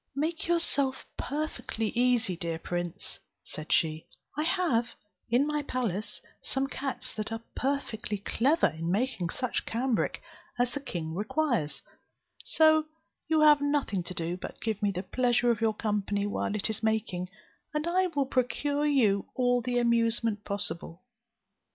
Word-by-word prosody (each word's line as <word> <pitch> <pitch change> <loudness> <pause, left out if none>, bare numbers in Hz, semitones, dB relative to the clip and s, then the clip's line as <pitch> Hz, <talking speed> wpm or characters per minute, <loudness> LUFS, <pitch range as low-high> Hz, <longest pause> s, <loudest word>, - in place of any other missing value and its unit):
"Make 315 +4 -1
yourself 290 -6 +1
perfectly 285 -7 -2
easy, 240 -5 +2
dear 165 -1 -3
prince," 175 0 -4 0.2
said 155 0 -7
she, 160 -1 +2 0.3
"I 300 - 0
have 320 -9 +2 0.4
in 245 +5 +4
my 300 0 0
palace 230 -7 -2 0.2
some 270 0 0
cats 270 -1 -4
that 215 0 -4
are 225 0 -4
perfectly 260 -6 -1
clever 265 - +2
in 165 +1 -1
making 200 -4 0
such 255 +7 -1
cambric 240 0 0 0.4
as 245 0 +2
the 285 - -2
king 170 - -4
requires; 210 - 0 0.6
so 315 -1 +5 0.4
you 315 -1 +3
have 300 -1 +7
nothing 285 -10 +1
to 185 - -7
do 170 +1 -2
but - - -7
to - - -11
give 220 -3 -1
me 205 - +3
the 185 -1 -2
pleasure 245 +2 +2
of 225 - -1
your 220 -1 +2
company 205 -2 0
while 205 0 -1
it 210 - 0
is 220 -1 -3
making; 215 -5 0 0.4
and 300 -1 -1
I 370 +2 +3
will 290 -5 0
procure 285 +3 +1
you 220 -9 +3
all 245 -1 +3
the 245 +1 -1
amusement 230 -2 +2
possible." 175 -3 -4
235 Hz, 150 wpm, -29 LUFS, 200-280 Hz, 0.6 s, have